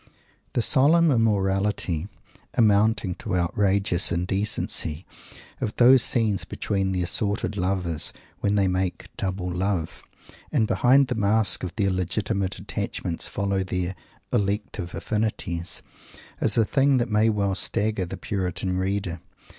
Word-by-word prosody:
The 120 - +2
solemn 155 +6 +4
immorality, 100 - 0 0.5
amounting 105 -2 +3
to - - -3
outrageous 95 +1 +2
indecency, 90 -2 -1 0.5
of 105 - -3
those 125 +1 +7
scenes 110 -6 +1
between 95 -1 -2
the 90 -1 -1
assorted 100 +4 -1
lovers 90 -4 -1 0.3
when 100 0 0
they 100 -2 +2
make 95 0 -3
"double" 95 -1 -3
love, 90 -2 -2 0.5
and 110 - +2
behind 130 +5 +4
the 125 - -2
mask 105 -2 +3
of 90 - -5
their 100 -3 +1
legitimate 95 +1 -2
attachments 85 -2 -4
follow 100 -1 -1
their 90 0 -3 0.4
"elective 100 -3 -2
affinities," 90 -6 -2 0.6
is - - +1
a 115 - +4
thing 135 +3 +2
that 120 -2 -1
may 105 +1 +3
well 100 -2 0
stagger 105 -1 -1
the 95 +2 -6
puritan 90 -1 -2
reader. 95 -2 -2
100 Hz, 125 wpm, -24 LUFS, 90-110 Hz, 0.6 s, those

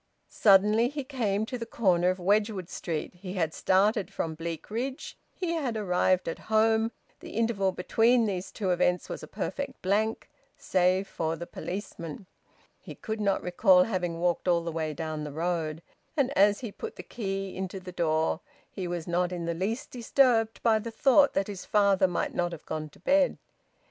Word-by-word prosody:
Suddenly 210 +3 +4
he 285 0 -4
came 220 -6 -1
to 250 +2 -5
the 230 - -4
corner 180 -5 +2
of 185 - 0
Wedgwood 200 0 +1
Street. 160 -3 -4
He 180 +1 -8
had 165 -5 -1
started 200 +2 +2
from 160 - -3
Bleakridge; 205 - -5 0.2
he 355 -3 -3
had 275 -9 -1
arrived 185 -2 +1
at 165 - -3
home: 220 +1 +3 0.3
the - - -10
interval 220 -4 +1
between 230 +6 +3
these 190 -3 -3
two 195 -4 -1
events 180 0 +1
was - - -5
a - - -9
perfect 280 0 -4
blank, 215 +4 0 0.3
save 185 +1 +2
for 160 -2 -2
the 170 - -6
policeman. 180 -2 -6 0.5
He - - -10
could 220 -1 -4
not 200 -1 +1
recall 180 +1 +5
having 180 -5 -2
walked 175 +1 0
all 170 -1 +3
the 170 - -3
way 155 -1 -3
down 155 -1 -4
the 150 - -5
road. 165 0 -2 0.3
And 280 -1 +1
as 205 +1 +4
he 235 -4 -5
put 450 - -7
the - - -8
key 195 -3 -4
into 190 0 -4
the 185 0 -9
door 160 -2 +1 0.3
he 185 -2 -4
was 175 -2 -4
not 175 +1 0
in 175 -2 -4
the 170 - -1
least 195 +8 -3
disturbed 235 -2 +2
by 225 -2 +4
the 230 +2 -5
thought 275 +5 +4
that 195 - +1
his 195 -2 -7
father 200 -2 +3
might 175 - -2
not 175 -1 -1
have 165 - -9
gone 155 -1 -4
to - - -20
bed. 280 - +3
190 Hz, 185 wpm, -28 LUFS, 175-220 Hz, 0.5 s, recall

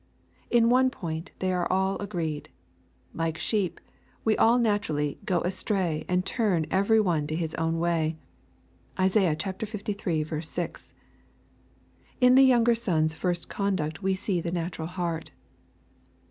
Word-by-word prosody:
In 235 -1 +4
one 260 +1 +5
point 165 -7 -5
only 185 0 +1
are 180 -1 0
all 190 +1 +1
agreed. 170 -7 -4 0.6
Like 165 -1 -2
sheep, 200 -3 -1 0.5
we 220 -1 +3
all 235 +2 +4
naturally 205 -11 0
"go 175 -3 +1
astray^ 180 -3 -1
and 180 +1 +1
turn 195 -10 +1
every 200 +4 +3
one 170 -8 +1
to 155 - -2
his 160 -1 -2
own 165 0 -1
way." 165 -2 0 0.8
(Isai. 185 -3 +3
liii. 190 -5 -3
6.) 170 +1 -5 1.3
In 250 -1 +6
the 265 - +7
younger 240 -2 +5
son's 160 -9 +1
first 175 +1 -2
conduct 185 -5 -2
we 190 -1 +1
see 190 -2 -1
the 170 - -3
natural 170 -2 -3
heart. 170 -2 -3
180 Hz, 135 wpm, -27 LUFS, 160-205 Hz, 1.3 s, the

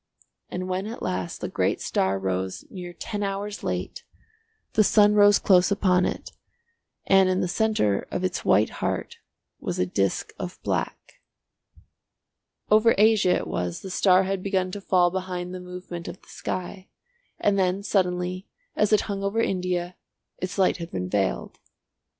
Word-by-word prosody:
And 185 +1 -4
when 185 +2 -2
at 230 - -7
last 90 -1 -3
the - - -2
great - - 0
star 95 +1 0
rose 95 -1 -3
near 180 -2 -7
ten 205 +4 -5
hours 200 +1 -3
late, - - -3 0.7
the 215 - +5
sun 210 0 +5
rose 205 -1 +6
close 180 -2 +4
upon 185 -3 +2
it, - - -5 0.7
and 195 -1 +5
in 185 0 +1
the - - 0
centre 175 - +1
of 180 - -3
its 185 -1 -2
white 105 +3 +3
heart - - -2 0.4
was - - -3
a 90 - +2
disc 95 +1 -1
of - - -6
black. - - -3 1.5
Over 220 +2 +5
Asia 210 -3 +4
it - - -2
was 90 -1 -3
the 190 - -7
star 185 0 +4
had 190 0 -2
begun 185 -1 -1
to 205 - -6
fall 180 -2 +3
behind 180 -1 -4
the 185 - -5
movement 180 -1 -8
of - - -7
the - - -23
sky, 185 +1 -5 0.5
and 200 -1 +2
then 185 +1 +1
suddenly, 180 -1 -1 0.3
as 210 0 +2
it 215 - +5
hung 200 -1 -4
over 200 +3 0
India, 180 -4 -1 0.4
its 185 +2 -4
light 190 -1 +3
had 170 -1 -6
been 90 - -4
veiled. 95 -1 -1
185 Hz, 160 wpm, -25 LUFS, 175-200 Hz, 1.5 s, rose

